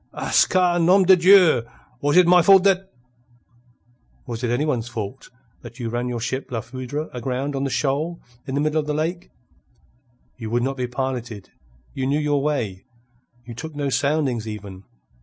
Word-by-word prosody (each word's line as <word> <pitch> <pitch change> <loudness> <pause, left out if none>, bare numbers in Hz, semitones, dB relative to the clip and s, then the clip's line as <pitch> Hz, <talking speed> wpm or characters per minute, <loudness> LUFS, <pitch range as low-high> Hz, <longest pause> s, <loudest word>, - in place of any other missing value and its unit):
"Ah - - -4 0.2
ca! 180 -2 +2
Nom 185 +3 +5
de 190 +1 +7
Dieu! 180 -6 +6 0.4
Was 145 +3 +2
it 180 - +7
my 180 +1 +6
fault 190 +2 +6
that...." 195 -1 +1 1.3
"Was 115 +1 -6
it 120 - 0
any 120 +5 0
one 150 -6 0
else's 115 +1 -8
fault 115 +3 -6 0.3
that 120 +1 -12
you 115 -2 -3
ran 120 +2 -2
your 120 -1 -3
ship 130 +4 -4
La 115 -2 -2
Foudre 130 +6 -6
aground 130 +3 -3
on 135 0 -2
the - - -1
shoal 150 +5 -1 0.3
in 135 - -3
the 145 - +1
middle 155 +1 +1
of 150 - -4
the 150 - -1
lake? 170 +4 -3 1.1
You 110 -2 -5
would 120 +1 0
not 135 +1 -2
be 125 -1 -2
piloted. 125 -5 -5 0.4
You 130 - -2
knew 145 +2 +1
your 145 -2 0
way. 120 -11 -2 0.6
You 120 - -8
took 150 +6 -8
no 145 -1 -2
soundings 140 -6 0
even. 100 -3 -8
135 Hz, 185 wpm, -22 LUFS, 120-160 Hz, 1.3 s, de